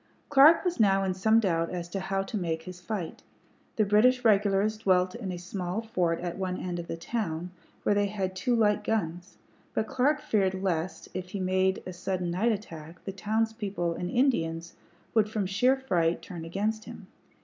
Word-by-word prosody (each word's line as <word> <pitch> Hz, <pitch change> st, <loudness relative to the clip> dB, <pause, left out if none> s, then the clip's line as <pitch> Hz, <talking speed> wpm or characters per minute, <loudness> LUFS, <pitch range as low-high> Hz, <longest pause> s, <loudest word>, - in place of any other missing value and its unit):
Clark 290 Hz, +6 st, +7 dB
was 360 Hz, -5 st, -1 dB
now 195 Hz, -2 st, +4 dB
in 190 Hz, -1 st, 0 dB
some 220 Hz, +5 st, +4 dB
doubt 165 Hz, -6 st, +1 dB
as 175 Hz, -1 st, -4 dB
to 195 Hz, -, -3 dB
how 195 Hz, +1 st, -1 dB
to 195 Hz, -, -6 dB
make 165 Hz, -5 st, -2 dB
his 180 Hz, 0 st, -9 dB
fight. 180 Hz, -4 st, -5 dB, 0.5 s
The 215 Hz, -, +3 dB
British 240 Hz, +5 st, +4 dB
regulars 205 Hz, 0 st, +3 dB
dwelt 185 Hz, -3 st, +2 dB
in 210 Hz, -6 st, -5 dB
a 180 Hz, -, -4 dB
small 180 Hz, +3 st, -4 dB
fort 180 Hz, -7 st, 0 dB
at 175 Hz, +1 st, -4 dB
one 185 Hz, -1 st, -2 dB
end 175 Hz, -1 st, -4 dB
of 170 Hz, -, -6 dB
the -, -, -4 dB
town, 175 Hz, -3 st, -3 dB, 0.3 s
where -, -, +3 dB
they 205 Hz, 0 st, +2 dB
had 195 Hz, -2 st, -3 dB
two 240 Hz, +6 st, +1 dB
light 210 Hz, -2 st, +2 dB
guns; 180 Hz, -4 st, -2 dB, 0.4 s
but 220 Hz, -, +1 dB
Clark 275 Hz, +6 st, +1 dB
feared 195 Hz, -3 st, +1 dB
lest, 175 Hz, -3 st, -2 dB
if 185 Hz, -1 st, -5 dB
he 200 Hz, -, -4 dB
made 185 Hz, 0 st, +1 dB
a 185 Hz, -, -6 dB
sudden 180 Hz, 0 st, -2 dB
night 210 Hz, +7 st, +2 dB
attack, 165 Hz, -6 st, -7 dB
the 195 Hz, -, -3 dB
townspeople 210 Hz, -3 st, -1 dB
and 175 Hz, +1 st, -4 dB
Indians 170 Hz, -10 st, 0 dB, 0.4 s
would 215 Hz, -2 st, +3 dB
from 215 Hz, -2 st, -1 dB
sheer 225 Hz, +8 st, +3 dB
fright 175 Hz, -10 st, 0 dB
turn 170 Hz, -4 st, -7 dB
against 210 Hz, +5 st, -2 dB
him. 235 Hz, -4 st, -10 dB
195 Hz, 190 wpm, -28 LUFS, 180-220 Hz, 0.5 s, Clark